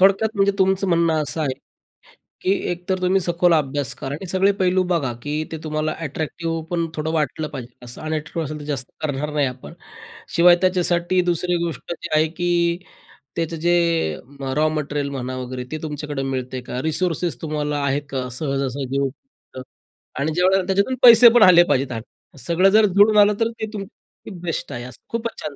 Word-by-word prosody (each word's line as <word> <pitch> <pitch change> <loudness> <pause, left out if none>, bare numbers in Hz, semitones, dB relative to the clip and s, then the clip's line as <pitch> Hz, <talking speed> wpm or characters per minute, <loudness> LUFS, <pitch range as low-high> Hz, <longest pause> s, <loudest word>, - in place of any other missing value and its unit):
थोडक्यात 195 +3 +4
म्हणजे 200 0 +3
तुमचं 190 +1 +2
म्हणणं 165 -2 +2
असं 150 +3 -4
आहे, 135 -4 -1 0.9
की 185 - +1 0.2
एकतर 180 +2 -3
तुम्ही 185 +1 +2
सखोल 175 0 +2
अभ्यास 145 -2 -1
करा 140 -1 -5
आणि 185 +5 -7
सगळे 190 +2 +3
पैलू 185 0 +3
बघा, 135 -8 0
की 150 +1 -2
ते 160 - -3
तुम्हाला 155 0 -1
अट्रॅक्टिव्ह 165 +3 -4
पण 170 -1 0
थोडं 155 0 -2
वाटलं 155 0 -1
पाहिजे 125 -4 -8
असं 120 - -9
अनॅट्रीव्ह 155 +1 -3
असेल 155 +1 -5
तर - - -8
जास्त 135 -4 -3
करणार 150 0 -2
नाही 145 -2 +1
आपण. 130 +5 -8 0.6
शिवाय 175 +1 +7
त्याच्यासाठी 180 -1 +2
दुसरी 175 +1 0
गोष्ट 170 +1 -5
जी 170 - -8
आहे, 155 +1 +4
की 170 0 0 0.6
त्याचं 165 0 -2
जे 175 +2 +2 0.8
रॉ 155 +1 +3
मटेरियल 145 -2 -2
म्हणा 130 -2 -4
वगैरे 125 0 -5
ते 155 - -3
तुमच्याकडे 150 -2 -4
मिळते 130 -1 -3
का? 125 +1 -5
रिसोर्सेस 170 +2 -1
तुम्हाला 150 -2 -2
आहे 140 +1 +1
का 130 -2 -3
सहजासहजी 135 -1 -2
उपब्ध 135 - -7 0.6
आणि 150 +3 0
ज्यावेळेला 185 +2 +2
त्याच्यातून 200 +7 +1
पैसे 235 -1 +10
पण 235 - +7
आले 175 -2 +8
पाहिजेत 135 -1 +2
त्यात. 115 -3 -4 0.4
सगळं 170 +9 +3
जर 215 +2 +5
जुळून 205 +2 +4
आलं, 205 0 +6
तर 225 0 +2
ते 220 - -2
तुम 205 - -4 0.6
बेस्ट 170 -2 -4
आहे, 120 - -5
असं 125 0 -11
खूपच 230 0 -4
छान 150 -2 -6
160 Hz, 175 wpm, -21 LUFS, 140-180 Hz, 0.9 s, पैसे